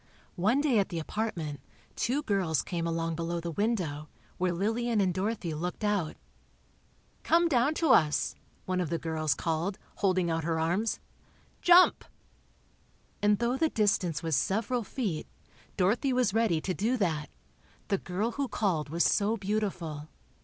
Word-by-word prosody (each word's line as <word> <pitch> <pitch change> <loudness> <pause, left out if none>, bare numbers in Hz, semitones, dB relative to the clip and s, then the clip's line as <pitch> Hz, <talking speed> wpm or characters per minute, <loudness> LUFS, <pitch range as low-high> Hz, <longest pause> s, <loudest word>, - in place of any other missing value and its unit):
One 220 +10 +3
day 270 -7 +3
at 200 - 0
the 175 - -4
apartment, 165 -5 -3 0.4
two 280 +5 0
girls 185 - 0
came 170 -1 -3
along 165 0 -1
below 170 +1 -2
the 170 0 -4
window, 165 -7 -1 0.3
where 180 0 +1
Lillian 225 +5 0
and 185 -3 +2
Dorothy 190 -2 -2
looked 175 +7 -4
out. 205 -7 0 1.1
"Come 340 +1 +3
down 275 0 +2
to 325 - +1
us," 150 -2 +3 0.3
one 185 0 0
of 170 - -2
the 170 - 0
girls 155 -4 -1
called, 170 +4 -2 0.2
holding 185 -3 +1
out 165 0 -1
her 165 0 0
arms—"Jump!" 220 - +2 1.2
And 205 0 +4
though 240 +3 0
the 320 +2 +2
distance 195 - +1
was 160 -2 +1
several 220 - 0
feet, 200 - -3 0.5
Dorothy 230 +9 +2
was 250 -6 +2
ready 220 -8 +2
to 185 - -2
do 230 +7 0
that—the 175 +2 -4
girl 200 +6 -2
who 280 +2 -2
called 180 - -1
was 170 +3 +1
so 215 +2 +2
beautiful. 185 -7 -3
190 Hz, 145 wpm, -29 LUFS, 165-225 Hz, 1.2 s, And